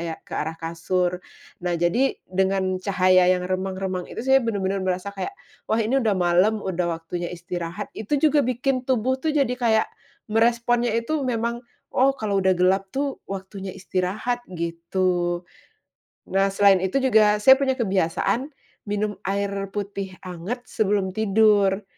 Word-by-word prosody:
ya 165 -1 -3
ke - - -15
arah 160 +1 -3
kasur. 175 +2 -1 0.4
Nah 175 -1 -1
jadi, 175 +11 +1
dengan 190 0 0
cahaya 185 -2 +4
yang 180 - -4
remang-remang 185 0 -3
itu. 235 - -6
Saya 265 0 +5
benar-benar 200 -5 -1
merasa 185 +1 -2
kayak, 200 - -5 0.3
"Wah 220 - +2
ini 265 +5 +2
udah 215 -5 +1
malam, 185 +4 +2
udah 180 -2 -1
waktunya 170 +1 -4
istirahat." 175 +2 -6
Itu 220 +7 -2
juga 300 +1 +3
bikin 255 +1 0
tubuh 260 +1 +1
tuh, 315 - -1
jadi 275 -4 +2
kayak 230 -3 +1 0.4
meresponnya 235 +1 +2
itu 260 +7 -1
memang, 235 -2 -1 0.3
"Oh 270 +1 +3
kalau 205 -4 0
udah 190 -1 +3
gelap 190 +2 +2
tuh, 275 +5 -3
waktunya 195 0 -6
istirahat," 190 +6 -2
gitu. 175 +1 -1 0.9
Nah, 195 +1 +2
selain 200 -1 +5
itu 190 +9 0
juga, 215 -5 +4
saya 265 +4 +8
punya 270 -1 +1
kebiasaan, 225 - 0 0.3
minum 205 0 -1
air 200 +1 0 0.2
putih 200 -2 -4
hangat, 185 +7 -5
sebelum 200 -2 0
tidur. 210 -2 +3
195 Hz, 145 wpm, -24 LUFS, 185-235 Hz, 0.9 s, saya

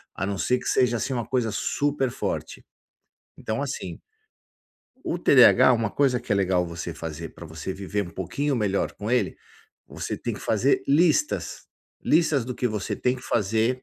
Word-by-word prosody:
A 95 - -2
não 100 0 -2
ser 125 - +1
que - - -12
seja, 120 -2 +2
assim, 130 +4 -2
uma 120 -3 -2
coisa 125 -4 0
super 140 +2 0
forte. - - -4 0.7
Então, - - -3
assim - - -5 1.1
o 170 - -1
TDH 130 -5 +6
uma 115 -3 0
coisa 130 -1 +2
que 120 -2 -7
é - - +4
legal 95 -2 +2
você 85 0 -6
fazer 80 0 -6
pra 85 - -12
você 80 +3 -6
viver 100 +1 -3
um - - -9
pouquinho 135 - -2
melhor 100 -3 0
com 105 +2 -6
ele, 125 0 +1 0.5
você - - -5
tem - - -4
que - - -9
fazer 120 +6 +2
listas. 165 - +2 0.4
Listas 155 -5 +2
do 125 +1 -5
que 125 - -1
você 105 -3 -3
tem 125 +1 0
que 125 - -12
fazer, 115 +4 0
115 Hz, 180 wpm, -25 LUFS, 100-130 Hz, 1.1 s, TDH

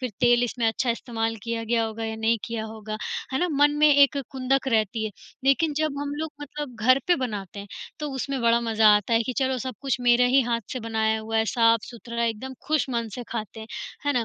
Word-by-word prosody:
फ़िर 255 -2 -3
तेल 240 0 +5
इसमें 240 -1 -1
अच्छा 235 +3 0
इस्तेमाल 225 -1 -2
किया 230 0 -3
गया 230 0 +1
होगा 225 0 -4
या 220 0 -3
नहीं 230 0 +3
किया 230 -2 -4
होगा, 215 -1 -6 0.4
है 265 - +1
ना? 360 - +1
मन 290 -1 +4
में 300 - +6
एक 280 -1 +5 0.2
खुंदक 270 +1 0
रहती 220 -1 +1
है, 215 - -2 0.3
लेकिन 295 +3 +3
जब 305 -2 0
हम 285 0 -3
लोग 315 +1 -3
मतलब 290 -3 -6
घर 255 +4 +5
पे 355 - +5
बनाते 205 -6 -4
हैं, 200 - -10 0.3
तो 300 - -2
उसमें 270 0 -3
बड़ा 235 0 +4
मज़ा 225 -2 +3
आता 210 +3 -1
है 230 - +4
कि 255 - -3
चलो 265 -1 +1
सब 255 0 -5
कुछ 270 -2 0
मेरे 245 0 +4
ही 265 +2 +5
हाथ 235 -1 -1
से 255 - -4
बनाया 220 -1 0
हुआ 225 +1 -3
है, 220 - +3
साफ़-सुथरा 230 +1 +1
एकदम 230 +4 -3
ख़ुश 305 -2 +1
मन 235 -2 -1
से 250 - -5
खाते 220 -1 -5
हैं, 220 - -8 0.4
है 290 - +3
ना? 240 -3 +1
235 Hz, 230 wpm, -25 LUFS, 225-265 Hz, 0.4 s, में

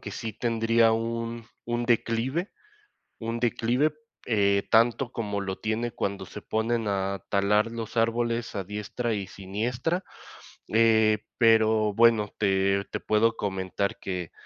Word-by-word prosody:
que - - -7
sí 110 -1 -5
tendría 115 -1 +2
un 115 0 -3 0.2
un 120 0 -1
declive 120 - 0 0.7
un 115 0 -3
declive, 125 +5 +1 0.3
eh, 100 -3 +2
tanto 120 +2 +3
como 105 -3 -3
lo 95 -1 -3
tiene 115 +2 -2
cuando 100 -2 -3
se 105 - -9
ponen 110 0 -1
a 100 -1 -1
talar 105 +3 +2
los 115 0 -6
árboles 115 +1 0
a 95 - -2
diestra 105 +4 -3
y 100 -2 -3
siniestra, 120 - -3 0.6
eh, 110 -1 +4 0.2
pero 110 -2 +4
bueno, 115 -2 +4
te 100 -1 +2
te - - -2
puedo 110 +1 +2
comentar 95 0 -2
que, 90 -3 -5
110 Hz, 135 wpm, -27 LUFS, 100-115 Hz, 0.7 s, eh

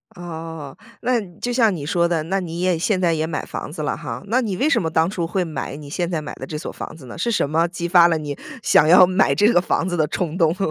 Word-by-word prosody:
哦， 160 -4 -7 0.3
那 245 -1 +1 0.2
就 245 - -2
像 225 -5 +3
你 145 -4 -6
说 170 +2 +2
的， 165 -2 0
那 190 +5 -1
你 170 -2 -5
也 180 -2 +2
现 185 +2 +1
在 175 -2 +2
也 160 0 -1
买 160 - -3
房 - - -6
子 155 -1 -5
了 - - -1
哈。 115 +1 -6
那 245 +5 +2
你 205 -6 -2
为 280 - +2
什 240 -8 +3
么 165 - -1
当 160 0 +2
初 180 -4 -2
会 185 +2 0
买 155 -4 -5
你 145 0 -10
现 175 +3 -2
在 170 -3 -1
买 150 - -7
的 130 - -7
这 150 - -5
所 150 - -6
房 - - -8
子 140 - -13
呢？ 120 - -9
是 235 - -1
什 215 -10 +1
么 165 +3 +2
激 175 0 -4
发 175 -1 +6
了 165 -2 +1
你 145 -2 -5 0.3
想 150 - +5
要 180 +2 +8
买 185 +2 +2
这 205 - +4
个 175 - +4
房 180 -1 0
子 175 - -2
的 155 -3 +1
冲 165 -1 -3
动？ 165 -2 +3
170 Hz, 305 characters per minute, -21 LUFS, 155-185 Hz, 0.3 s, 要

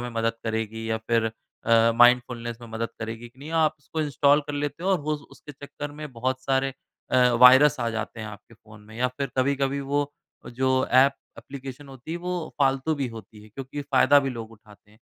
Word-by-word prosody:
में 120 0 -5
मदद 115 0 0
करेगी, 110 0 -3
या 110 - 0
फिर 115 -1 +2 0.4
अ, 115 0 +5
माइंडफुलनेस 120 -1 +3
में 120 - -10
मदद 115 +1 -3
करेगी, 115 +1 -6
कि 125 +2 -27
नहीं? 145 +3 -9
आप 160 -2 +2
उसको 150 +3 -5
इंस्टॉल 145 -1 +3
कर 145 - -4
लेते 145 +3 -3
हो 190 - +1
और 190 - +3
होज़ 150 -1 -1
उसके 150 - -13
चक्कर 145 +1 -8
में 150 -2 -8
बहुत 130 +2 -2
सारे 135 0 +1 0.4
अ, 125 -1 +5
वायरस 130 +3 +8
आ 115 - 0
जाते 115 0 -5
हैं 110 - -5
आपके 105 +2 -12
फ़ोन 110 0 -17
में। 110 +1 -15
या 125 +1 +1
फिर 135 +2 -5
कभी-कभी 140 +1 +1
वो 145 +1 -1 0.3
जो 130 +2 -1 0.2
एप 135 +2 +6 0.2
एप्लीकेशन 135 +1 -9
होती 135 +3 -11
है, - - -2
वो 175 -2 -4
फ़ालतू 135 +3 +2
भी 140 -3 -2
होती 105 -1 -12
है, 110 - -15
क्योंकि 135 +5 -7
फ़ायदा 140 0 +5
भी 135 - -1
लोग 115 -2 -7
उठाते 105 -1 -19
हैं। 110 - -23
130 Hz, 210 wpm, -25 LUFS, 115-145 Hz, 0.4 s, वायरस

